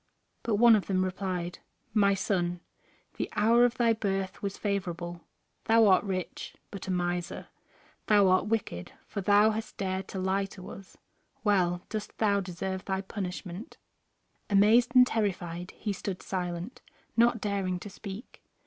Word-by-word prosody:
But 225 Hz, -, 0 dB
one 235 Hz, +1 st, +7 dB
of 205 Hz, -, -1 dB
them 185 Hz, -1 st, +1 dB
replied: 185 Hz, -2 st, -3 dB, 0.3 s
"My 200 Hz, -2 st, +4 dB
son, 175 Hz, -3 st, -1 dB, 0.6 s
the -, -, -2 dB
hour 235 Hz, +3 st, +5 dB
of 245 Hz, 0 st, +1 dB
thy 235 Hz, -2 st, +4 dB
birth 195 Hz, -3 st, -2 dB
was 200 Hz, -1 st, -3 dB
favorable; 175 Hz, -4 st, -3 dB, 0.4 s
thou 225 Hz, 0 st, +5 dB
art 190 Hz, -3 st, +5 dB
rich, 185 Hz, -3 st, -4 dB, 0.2 s
but 200 Hz, -2 st, -7 dB
a -, -, -1 dB
miser; 175 Hz, 0 st, -2 dB, 0.6 s
thou 205 Hz, -2 st, +5 dB
art 185 Hz, +2 st, +3 dB
wicked, 205 Hz, -, -2 dB
for 200 Hz, -, -4 dB
thou 205 Hz, +3 st, +5 dB
hast 220 Hz, 0 st, -5 dB
dared 190 Hz, -1 st, -2 dB
to -, -, -6 dB
lie 190 Hz, +1 st, +1 dB
to 190 Hz, -1 st, -10 dB
us. 195 Hz, -1 st, -12 dB, 0.5 s
Well 180 Hz, -4 st, +2 dB
dost 215 Hz, -1 st, -5 dB
thou 205 Hz, -2 st, +3 dB
deserve 190 Hz, +1 st, -4 dB
thy 190 Hz, -1 st, -1 dB
punishment." 190 Hz, 0 st, -6 dB, 0.7 s
Amazed 225 Hz, +5 st, +5 dB
and 250 Hz, 0 st, +9 dB
terrified 180 Hz, -6 st, -2 dB
he 210 Hz, -2 st, -2 dB
stood 190 Hz, -1 st, -5 dB
silent, 180 Hz, +3 st, -4 dB, 0.3 s
not 235 Hz, 0 st, +4 dB
daring 195 Hz, -3 st, -1 dB
to 205 Hz, -, -7 dB
speak. 200 Hz, +3 st, -9 dB
195 Hz, 150 wpm, -29 LUFS, 185-215 Hz, 0.7 s, and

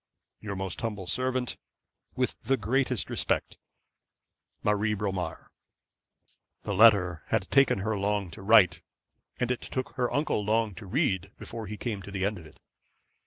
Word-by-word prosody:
'Your 100 Hz, -2 st, -5 dB
most 95 Hz, -1 st, -4 dB
humble 105 Hz, -5 st, -3 dB
servant, 130 Hz, +5 st, -1 dB, 0.6 s
'With -, -, 0 dB
the 135 Hz, +4 st, +1 dB
greatest 125 Hz, +1 st, 0 dB
respect, -, -, -1 dB, 1.0 s
'MARIE 105 Hz, +1 st, +1 dB
BROMAR.' 95 Hz, -5 st, -4 dB, 1.1 s
The 100 Hz, -, -2 dB
letter 95 Hz, -5 st, +5 dB
had 110 Hz, -4 st, -1 dB
taken 135 Hz, -7 st, +4 dB
her 110 Hz, +2 st, -1 dB
long 100 Hz, -2 st, -1 dB
to -, -, -10 dB
write, 95 Hz, -5 st, +5 dB, 0.6 s
and 125 Hz, 0 st, 0 dB
it 125 Hz, -, -2 dB
took 130 Hz, -1 st, -4 dB
her 125 Hz, -1 st, +1 dB
uncle 145 Hz, -7 st, 0 dB
long 110 Hz, 0 st, +1 dB
to 95 Hz, +2 st, -10 dB
read, 100 Hz, -, 0 dB
before 115 Hz, -2 st, -7 dB
he 105 Hz, +2 st, -6 dB
came 105 Hz, -2 st, -3 dB
to 95 Hz, -, -10 dB
the 100 Hz, -1 st, -1 dB
end 100 Hz, -1 st, -1 dB
of 80 Hz, -, -12 dB
it. 75 Hz, -, -19 dB
105 Hz, 155 wpm, -28 LUFS, 95-115 Hz, 1.1 s, letter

